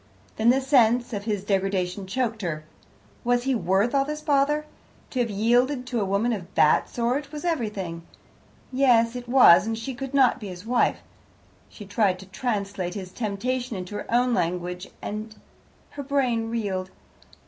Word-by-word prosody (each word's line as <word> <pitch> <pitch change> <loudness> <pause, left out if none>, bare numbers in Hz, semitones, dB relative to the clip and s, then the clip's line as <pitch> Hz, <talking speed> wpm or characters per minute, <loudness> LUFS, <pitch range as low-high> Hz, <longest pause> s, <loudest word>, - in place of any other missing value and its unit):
Then 220 +2 +3
the 265 +2 +4
sense 245 -3 +3
of 205 -1 -4
his 205 -4 -2
degradation 195 -1 -1
choked 225 +1 -2
her. 155 -4 -3 0.6
Was 245 0 +2
he 270 +1 +1
worth 205 +1 +1
all 275 -1 +3
this 300 +2 -5
bother? 295 +1 +2 0.5
To 255 - -2
have 240 -2 +1
yielded 245 +6 +2
to 245 -3 -2
a - - 0
woman 200 +5 +1
of 185 -5 -5
that 150 - +4
sort 255 +5 -1
was 300 +2 -6
everything, 210 - -2 0.7
yes, 245 -3 +3
it 245 -1 -7
was, 240 -7 +7
and 225 0 -2
she 230 +4 -5
could 270 +2 -6
not 260 -2 +4
be 210 - -7
his 180 +1 -9
wife. 245 +1 +1 0.7
She 210 - -11
tried 200 -2 +1
to 190 - -12
translate 195 -3 -3
his 185 -3 -6
temptation 240 +3 -3
into 180 +2 -7
her 205 - -6
own 245 +1 +3
language, 180 -2 -2 0.2
and 215 +1 -5 0.6
her 285 - -6
brain 255 -5 0
reeled. 195 -5 -2
225 Hz, 170 wpm, -25 LUFS, 195-255 Hz, 0.7 s, was